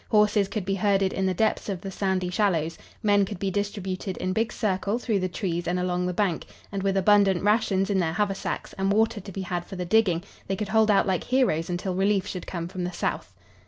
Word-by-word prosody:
Horses 210 -2 +4
could 205 -2 -4
be 195 - 0
herded 195 -1 +2
in 190 0 0
the 185 - +1
depths 220 +2 0
of 190 -3 -2
the 195 - -6
sandy 190 -2 -1
shallows. 170 -5 +1 0.3
Men 205 -1 +4
could 195 0 -4
be 195 +1 -2
distributed 195 -2 -3
in 185 - -2
big 225 +3 0
circle 200 +1 -1
through 225 -4 0
the 185 0 -1
trees 175 -2 -3
and 180 +1 0
along 180 0 0
the - - 0
bank; 180 -2 -1 0.2
and, 200 -1 -3
with 195 0 +1
abundant 195 -1 +4
rations 205 -2 +2
in 195 - +2
their 165 -3 0
haversacks 195 0 -2
and 195 +1 +1
water 220 0 +2
to 195 - -9
be 195 - -5
had 175 -1 -3
for 190 - -9
the 180 -1 -3
digging, 180 -3 +3 0.2
they 195 - -1
could 210 +1 -4
hold 220 0 +4
out 200 - +4
like 185 -3 0
heroes 245 -12 +1
until 180 +1 -2
relief 195 +1 +2
should 180 - -6
come 170 -2 -4
from 180 0 -5
the 180 - -2
south. 175 - -3
195 Hz, 235 wpm, -26 LUFS, 180-205 Hz, 0.3 s, Horses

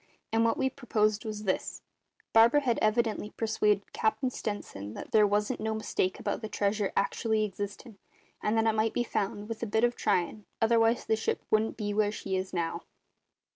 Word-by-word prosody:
And 225 0 +4
what 230 - +2
we 265 - +2
proposed 215 -5 0
was 215 -1 -4
this: 190 -3 -2 0.5
Barber 235 +6 +6
had 245 -5 +1
evidently 215 -1 +1
persuaded 210 -2 +1
Cap'n 250 +4 0
Stenson 110 - -5
that - - -8
there 210 -1 +5
wasn't 210 +4 0
no 220 0 -1
mistake 190 -3 -1
about - - -2
the 220 - -5
treasure 205 0 0
actually 215 +2 +1
existin', 205 +2 -7 0.4
and 215 +2 +1
that 225 - +3
it 225 - +3
might 220 0 +1
be 240 - +1
found, 205 -2 -2
with 225 -1 -6
a 235 - -2
bit 220 +2 +1
of 240 0 +3
tryin', 200 +1 0
otherwise 225 +1 +3
the 220 - +2
ship 220 - -1
wouldn't 215 +1 +2
be 205 -2 -2
where 210 0 +2
she 195 -2 -3
is 185 0 -2
now. 170 -2 -2
215 Hz, 185 wpm, -29 LUFS, 205-225 Hz, 0.5 s, Barber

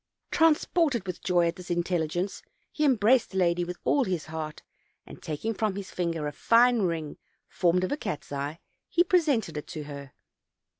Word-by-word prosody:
Transported 320 - +2
with 180 -2 -5
joy 175 -2 +2
at 170 +2 -3
this 180 -1 -10
intelligence, 175 +1 -1 0.3
he 305 - -2
embraced 250 -2 +4
the 190 - -6
lady 175 -1 +2
with 175 0 -5
all 280 - +3
his 180 - -2
heart, 155 -1 -6 0.4
and, - - -12
taking 160 +9 -3
from 210 -2 -1
his 195 -1 -6
finger 165 -3 -2
a 145 - -2
fine 235 +9 +4
ring 165 -5 -2 0.3
formed 180 0 +1
of 185 - -1
a 290 - 0
cat's 150 - -5
eye, 145 +3 -4 0.3
he 345 - +4
presented 290 - +1
it' 150 - -6
to 155 -3 -6
her. 140 -2 -9
180 Hz, 180 wpm, -27 LUFS, 160-230 Hz, 0.4 s, embraced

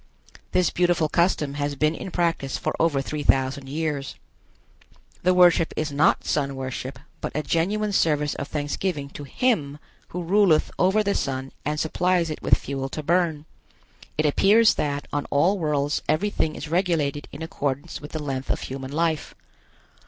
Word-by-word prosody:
This 180 -2 +2
beautiful 175 -3 +2
custom 155 -4 +1
has 145 0 -2
been 155 +3 +2
in 190 - -6
practice 165 -6 -1
for - - -2
over 145 -5 +2
three 150 +2 -4
thousand 135 0 +1
years. 150 -2 -3 1.1
The 180 - +3
worship 175 -2 +5
is 155 -1 -1
not 145 +2 +3
sun 140 -2 0
worship, 130 0 -5 0.2
but - - -4
a 150 - 0
genuine 205 +7 0
service 150 -5 +2
of 140 - -5
thanksgiving 145 0 -3
to 145 - -8
Him 150 - 0 0.3
who 180 0 -5
ruleth 185 -3 +3
over 190 +4 +3
the 200 -1 +1
sun 135 0 -2
and 150 +1 -1
supplies 175 +1 +1
it 155 - -6
with - - +4
fuel 135 -1 -4
to 155 - -5
burn. 165 -2 +1 0.7
It 155 - +2
appears 210 +9 +5
that 145 -1 -2
on 145 -1 -1
all 180 +8 +2
worlds 145 -2 0
everything 155 -1 +1
is 150 - -6
regulated 160 -4 0
in - - -7
accordance 140 -4 -3
with 145 - -8
the 155 -2 -4
length 135 -2 -4
of - - 0
human 135 0 -6
life. 160 0 -1
155 Hz, 165 wpm, -24 LUFS, 140-175 Hz, 1.1 s, worship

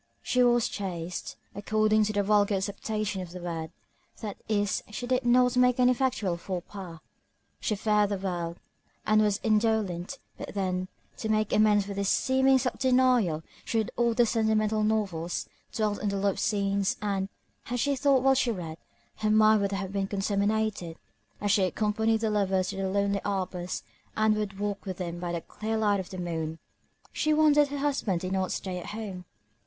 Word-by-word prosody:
She 250 - +2
was 240 -1 +4
chaste, 180 -3 -5 0.2
according 215 +1 +2
to 215 - -2
the 205 -1 +1
vulgar 205 0 +3
acceptation 200 +1 -2
of 180 - -7
the 180 - -6
word, 165 -2 -4 0.5
that 210 -3 -5
is, 205 -2 +1
she 215 +3 -5
did 255 +1 +1
not 250 0 +4
make 250 0 +4
any 250 0 +5
actual 215 -9 0
faux 180 0 -5
pas; 185 -5 -8 0.6
she 215 - -1
feared 210 0 +2
the 200 - -1
world, 175 -3 -3 0.5
and 215 0 +4
was 210 -1 +2
indolent; 215 -2 +1 0.2
but - - -7
then, 185 -2 -1 0.3
to 220 - -4
make 215 -1 +1
amends 210 -2 +4
for 200 - -5
this 200 0 -1
seeming 265 0 +4
self 255 0 -2
denial, 250 - +3 0.2
she 230 - -2
read 220 -1 0
all 235 -1 +2
the 240 - +5
sentimental 220 -1 +1
novels, 195 -6 -1 0.2
dwelt 210 -2 -1
on 210 - 0
the 200 - -1
love 195 0 0
scenes, 200 -1 0
and, 195 -2 -1 0.4
had 245 0 -3
she 280 +3 +1
thought 270 -1 +3
while 270 0 +5
she 255 -2 +1
read, 165 -6 -6 0.4
her 215 - 0
mind 215 0 +5
would 200 0 0
have 195 -1 -3
been 195 -1 0
contaminated; 200 -3 -1 0.4
as 205 -1 0
she 205 - +4
accompanied 220 +3 +1
the 220 -1 +1
lovers 190 -3 +1
to 200 - -5
the 195 -1 -1
lonely 200 0 +1
arbors, 185 -3 -3 0.3
and 215 0 +3
would 210 -2 -3
walk 205 -1 -2
with 185 -2 -4
them 175 -2 -4
by 175 -1 -3
the 170 -1 -2
clear 220 +6 -4
light 205 -2 +2
of 185 - -6
the 185 - -7
moon. 165 -2 -3 0.6
She 305 0 +2
wondered 295 -1 +5
her 285 +1 -5
husband 275 -11 0
did 185 - -3
not 190 -1 0
stay 185 -2 -3
at 175 - -8
home. 190 -5 -6
205 Hz, 185 wpm, -28 LUFS, 190-220 Hz, 0.6 s, any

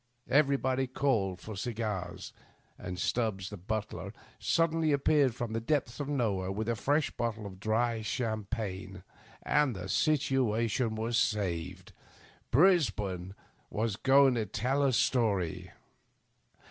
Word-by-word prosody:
Everybody 135 -2 +2
called 115 -9 0
for 110 - -7
cigars, 105 -5 -4 0.4
and 90 -1 -6
Stubbs 95 +1 -1
the 105 - -6
bntler 105 +4 -4 0.3
suddenly 165 -1 +2
appeared 140 -3 +3
from 120 -3 -4
the 115 - -1
depths 125 -1 -1
of 145 - -3
nowhere 100 -9 0
with 105 +3 -3
a 120 - +1
fresh 145 +7 +1
bottle 115 -2 -3
of 95 -2 -9
dry 110 +2 0
cham 110 -1 -2
pagne. 95 -4 -5 0.4
The 125 -11 +1
situation 115 - +1
was 115 +2 0
saved; 95 -9 -2 0.6
Brisbane 105 - +2 0.3
was 110 -1 -1
going 135 +3 +5
to 110 -3 -1
t^ll 135 +5 +1
a - - +2
story. 105 -9 +1
115 Hz, 120 wpm, -31 LUFS, 100-135 Hz, 0.6 s, going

